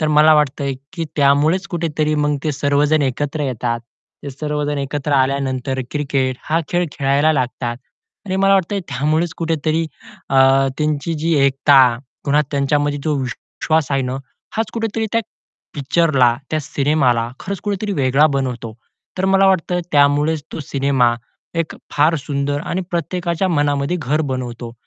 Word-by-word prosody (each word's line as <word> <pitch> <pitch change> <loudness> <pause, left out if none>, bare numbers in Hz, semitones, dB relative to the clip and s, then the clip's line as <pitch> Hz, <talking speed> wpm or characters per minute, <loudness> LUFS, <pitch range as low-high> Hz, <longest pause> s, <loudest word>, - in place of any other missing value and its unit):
तर 155 - +1
मला 155 +1 +6
वाटतंय 140 -2 +1 0.2
की 170 -3 -3
त्यामुळेच 150 +6 +3
कुठेतरी 155 -3 -1
मग 150 0 +1
ते 155 - 0
सर्वजण 145 +2 +2
एकत्र 145 +3 -2
येतात. 120 -3 -2 0.4
ते 140 - -6
सर्वजण 150 +1 -2
एकत्र 140 +1 -3
आल्यानंतर 130 -1 0
क्रिकेट 135 -3 -1
हा 160 +2 +1
खेळ 175 0 +1
खेळायला 140 +3 +2
लागतात 125 -3 -2 0.5
आणि 185 - -1
मला 195 0 +4
वाटतंय 195 +1 0
त्यामुळेच 155 +5 0
कुठेतरी 160 0 0 0.4
अ, 135 0 +5
त्यांची 150 +2 -1
जी 160 +2 0
एकता, 135 0 +5 0.4
पुन्हा 145 +1 +3
त्यांच्यामध्ये 145 +1 0
जो 155 -2 +1
विश्वास 145 +3 -2
आहे 135 -1 +1
ना 130 +1 -3 0.4
हाच 225 - -1
कुठेतरी 225 -1 -2
त्या 230 - +3 0.5
पिक्चरला, 135 -4 +2
त्या 155 - 0
सिनेमाला 135 -5 +1
खरंच 200 -1 -5
कुठेतरी 205 0 -2
वेगळा 140 -2 +3
बनवतो. 125 -4 -3 0.5
तर 185 - 0
मला 195 0 +4
वाटतं 180 -1 +2
त्यामुळेच 145 +2 +3
तो - - -5
सिनेमा 135 -4 +1 0.5
एक 165 - -4 0.2
फार 150 +3 +3
सुंदर 145 0 -2
आणि 185 - -1
प्रत्येकाच्या 175 +2 -1
मनामध्ये 145 0 +1
घर 150 +5 0
बनवतो. 120 -2 -5
145 Hz, 140 wpm, -19 LUFS, 135-160 Hz, 0.5 s, मला